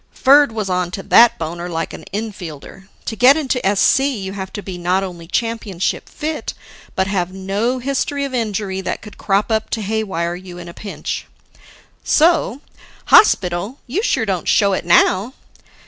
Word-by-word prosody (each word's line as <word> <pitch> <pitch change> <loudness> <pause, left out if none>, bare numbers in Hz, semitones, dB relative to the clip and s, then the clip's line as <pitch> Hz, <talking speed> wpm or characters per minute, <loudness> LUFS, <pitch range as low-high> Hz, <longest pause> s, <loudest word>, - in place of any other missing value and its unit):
Ferd 280 0 +5
was 215 -3 -3
onto 180 +1 -2
that 235 0 +6
boner 170 +2 -5
like 165 -1 -3
an - - -9
infielder. 195 -4 -7 0.2
To 220 - -3
get 255 +6 +6
into 265 -5 -1
SC 195 +6 +3
you 225 -9 -2
have 190 -1 -6
to 205 - -6
be 185 -2 -7
not 180 +2 +1
only 175 -3 -7
championship 215 -3 -2
fit, 310 +1 -4 0.4
but 190 - +1
have 185 -2 -1
no 200 +6 -1
history 275 +2 -1
of 275 - -6
injury 210 -5 -2
that - - -4
could 210 - -12
crop 200 +3 +1
up 220 0 0
to 220 - -2
haywire 195 -5 -2
you 180 0 -9
in 175 0 -9
a 170 - -9
pinch. 205 +2 -6 0.8
So, 315 -5 +2 0.5
"Hospital? 185 - +4
You 300 +11 -2
sure 330 - +1
don't 185 -6 -2
show 200 -2 +3
it 185 - -2
now." 190 +7 +3
200 Hz, 165 wpm, -19 LUFS, 185-235 Hz, 0.8 s, that